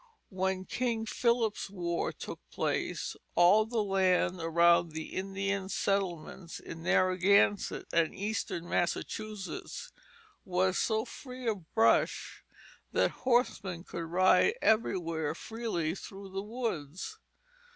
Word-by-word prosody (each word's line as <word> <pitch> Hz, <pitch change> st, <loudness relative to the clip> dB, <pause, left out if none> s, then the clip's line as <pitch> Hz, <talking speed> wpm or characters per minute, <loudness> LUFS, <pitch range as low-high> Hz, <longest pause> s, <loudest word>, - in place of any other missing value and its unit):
When 190 Hz, 0 st, -1 dB
King 235 Hz, -1 st, -1 dB
Philip's 230 Hz, -2 st, +1 dB
War 175 Hz, -3 st, -2 dB
took -, -, -8 dB
place, -, -, -2 dB, 0.2 s
all 200 Hz, +5 st, +6 dB
the 225 Hz, -2 st, 0 dB
land 185 Hz, -2 st, +2 dB
around 170 Hz, 0 st, +4 dB
the 160 Hz, 0 st, -6 dB
Indian 195 Hz, 0 st, -2 dB
settlements 185 Hz, -4 st, -2 dB
in 165 Hz, -, -9 dB
Narragansett 185 Hz, +3 st, +3 dB
and 165 Hz, -1 st, +2 dB
eastern 200 Hz, -4 st, -3 dB
Massachusetts 215 Hz, -, -3 dB, 0.5 s
was 185 Hz, -1 st, +1 dB
so 220 Hz, 0 st, +1 dB
free 255 Hz, -2 st, -8 dB
of 195 Hz, -7 st, -2 dB
brush 225 Hz, 0 st, +2 dB, 0.5 s
that -, -, +2 dB, 0.2 s
horsemen 195 Hz, -8 st, +1 dB
could 165 Hz, -, -5 dB
ride 185 Hz, -, +4 dB
everywhere 165 Hz, -, +1 dB
freely 220 Hz, -9 st, -2 dB
through 195 Hz, +1 st, -9 dB
the 195 Hz, +1 st, -3 dB
woods. 210 Hz, -, -4 dB
190 Hz, 110 wpm, -31 LUFS, 175-220 Hz, 0.5 s, all